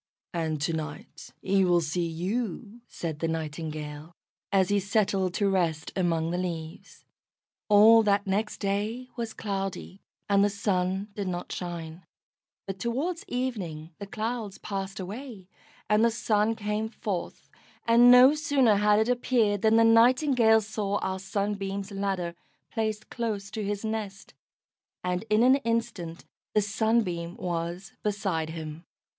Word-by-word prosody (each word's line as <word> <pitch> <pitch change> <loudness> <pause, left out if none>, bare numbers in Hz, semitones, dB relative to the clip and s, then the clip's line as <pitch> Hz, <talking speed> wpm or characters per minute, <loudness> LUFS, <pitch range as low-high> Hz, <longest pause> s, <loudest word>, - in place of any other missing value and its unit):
"And 160 -3 -1
to 165 - 0
night 155 -2 -6
he 195 0 +3
will 175 -1 +4
see 170 +2 -1
you," 205 +6 -4
said 160 -3 -5
the 165 - 0
Nightingale, 155 -1 -5 0.4
as 190 -2 +3
he 205 0 +3
settled 195 -2 0
to 200 - +2
rest 170 -5 0
among 165 -3 0
the 175 - -1
leaves. 165 -3 -6 0.6
All 215 +2 +8
that 205 -1 +2
next 205 +3 -1
day 215 +5 -2
was 230 -3 -4
cloudy, 195 -2 -4 0.3
and 200 -1 +4
the 205 - +3
Sun 195 0 -1
did 200 -1 -4
not 175 -1 -4
shine, 170 -1 -6 0.6
but 195 -1 -6
towards 280 - -2
evening 190 -11 -4
the 200 - -6
clouds 215 -1 -4
passed 195 0 -5
away 205 +1 -7 0.4
and 210 +1 +3
the 235 - +5
Sun 220 -1 +1
came 210 +1 -2
forth, 205 -5 -5 0.4
and 235 +1 +7
no 250 +3 +9
sooner 275 -8 +3
had 210 0 +4
it 220 +1 +2
appeared 240 -5 +1
than 220 +1 +4
the 230 - +6
Nightingale 230 0 +5
saw 210 -1 -2
our 190 0 -2
Sunbeam's 195 0 -3
ladder 195 -3 -2 0.4
placed 215 -1 -3
close 210 -4 -3
to 215 -1 -4
his 205 +1 -3
nest, 210 -3 -5 0.7
and 180 +3 -2
in 215 +2 +4
an 260 +2 +6
instant 230 -9 -3 0.3
the 210 - +5
Sunbeam 200 -5 0
was 175 +2 -4
beside 195 -6 -1
him. 160 0 -7
200 Hz, 140 wpm, -27 LUFS, 180-220 Hz, 0.7 s, no